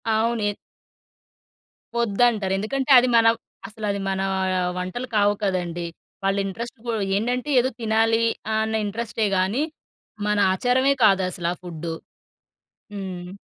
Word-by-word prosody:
అవును. 230 0 +1
ఎత్ - - -11 1.4
వద్దంటారు. 220 -3 +2
ఎందుకంటే 265 +7 -1
అది 255 - +2
మనవ్ 225 0 +5 0.3
అసలది 210 -2 -3
మన 190 0 -1 0.6
వంటలు 185 +8 -4
కావు 205 0 +4
కదండీ. 175 -3 -1 0.4
వాళ్ళ 195 +1 +1
ఇంట్రెస్ట్ 230 +6 -6
పో 235 - -1 0.2
ఏందంటే 245 +6 -1
ఏదో 255 - +2
తినాలీ. 225 +1 +2 0.3
అన్న 220 0 0
ఇంట్రస్టే 220 0 -2
గాని 200 +10 +1 0.6
మన 210 0 +1 0.2
ఆచారమే 255 +6 +2
కాదసల 185 -4 +2
ఆ - - -26
ఫుడ్డు. 165 -1 -5 1.0
హ్మ్. 185 -3 -6
215 Hz, 115 wpm, -23 LUFS, 190-235 Hz, 1.4 s, మనవ్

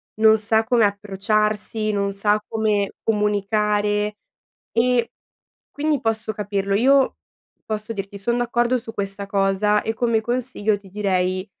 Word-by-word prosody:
non 220 0 +5
sa 220 +1 +2
come 235 -1 +3
approcciarsi, 210 +2 0
non 200 -1 0
sa 210 +1 +2
come 215 -2 0
comunicare 210 0 +1 0.6
e 240 0 +1 0.6
quindi 295 -1 0
posso 225 -2 -1
capirlo. 200 -1 -2
Io 265 +4 +4 0.5
posso 215 +1 -4
dirti, 200 -1 -6
son 235 +4 0
d'accordo 240 +1 +1
su 225 -1 -8
questa 200 0 -4
cosa 200 +1 +1
e 225 - -3
come 230 -1 +1
consiglio 240 -3 -1
ti 195 -1 -17
direi 185 -2 0
210 Hz, 130 wpm, -22 LUFS, 200-225 Hz, 0.6 s, non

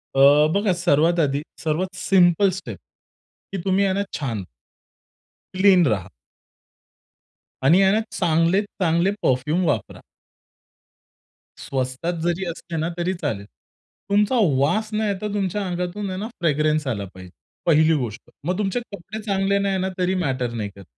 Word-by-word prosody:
अ, 145 +3 +6
बघा 200 -2 +2
सर्वात 170 -1 +2
आधी 140 -2 +1 0.2
सर्वात 175 +4 -1
सिम्पल 185 0 +4
स्टेप, 115 - -8 0.7
की 195 - -3
तुम्ही 195 +1 +2
आहे 190 - +1
ना 200 +1 0
छान 115 -10 -3 1.1
क्लीन 190 -3 +5
रहा. 95 -7 -1 1.5
आणि 155 +7 +6
ह्यांना 195 +3 +4 0.2
चांगलेत 170 +3 +2 0.2
चांगले 170 +3 +2
परफ्युम 150 +8 +1
वापरा. 115 -9 -2 1.6
स्वस्तात 130 +5 -3
जरी 175 +2 0
असले 165 0 -7
ना, 160 +1 -1
तरी 175 +2 0
चालेल. 140 - -4 0.6
तुमचा 210 +5 +2 0.2
वास 215 +10 +1
नाहीतर, 210 -1 -1
तुमच्या 200 0 -1
अंगातून 180 +3 -3
आहे 185 0 -4
ना, 215 - -3
फ्रेग्रन्स 155 -2 +1
आला 100 -5 -2
पाहिजे, 95 -1 -12 0.3
पहिली 160 -1 +4
गोष्ट. 115 -5 -5 0.2
मग 180 +2 0
तुमचे 205 +3 -1
कपडे 210 +3 -7
चांगले 200 -1 +1
नाही 195 -1 0
ना, 190 0 -1
तरी 185 +1 +1
मॅटर 130 -8 -1
नाही 110 -3 -4
करत. 100 -2 -13
175 Hz, 135 wpm, -22 LUFS, 140-195 Hz, 1.6 s, अ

